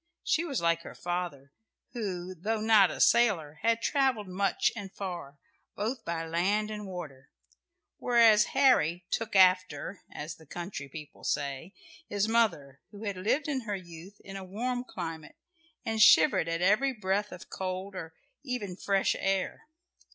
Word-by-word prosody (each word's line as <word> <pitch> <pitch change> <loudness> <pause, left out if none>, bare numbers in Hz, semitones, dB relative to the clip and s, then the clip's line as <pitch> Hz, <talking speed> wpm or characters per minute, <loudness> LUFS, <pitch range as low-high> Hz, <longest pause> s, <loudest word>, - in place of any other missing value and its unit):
She 320 - +1
was 280 - -2
like 170 0 +2
her - - -10
father, 175 -6 -4 0.4
who, 185 -6 -4
though 215 +6 -2
not 215 -3 +5
a - - -6
sailor, 175 -11 +3
had 230 +1 +1
travelled 265 -8 +1
much 195 +2 +1
and 200 -4 -7
far, 175 -9 -6 0.4
both 225 +4 -3
by 165 -2 -3
land 195 +6 0
and 210 -1 -6
water; 150 -8 -8 0.7
whereas 230 -3 +5
Harry 180 - +4
"took 225 -2 -2
after," 185 -2 +3
as 150 +1 -6
the 160 - -18
country 170 -4 -6
people 150 +1 -10
say, 145 +5 -2 0.4
his 205 +1 0
mother, 175 - +1
who 205 +1 -11
had 200 -2 -2
lived 220 +11 0
in 275 -4 -1
her 210 -3 -3
youth 180 +2 -11
in 195 - -10
a 195 - -6
warm 245 +6 -3
climate, 165 -9 -7 0.5
and 220 -1 0
shivered 255 - +6
at 165 +1 -1
every 230 +8 +3
breath 205 -1 -1
of 180 - -11
cold 190 +1 -4
or 165 -3 -7 0.3
even 250 -9 -4
fresh 195 +1 +1
air. 195 +7 -1
195 Hz, 155 wpm, -29 LUFS, 170-220 Hz, 0.7 s, shivered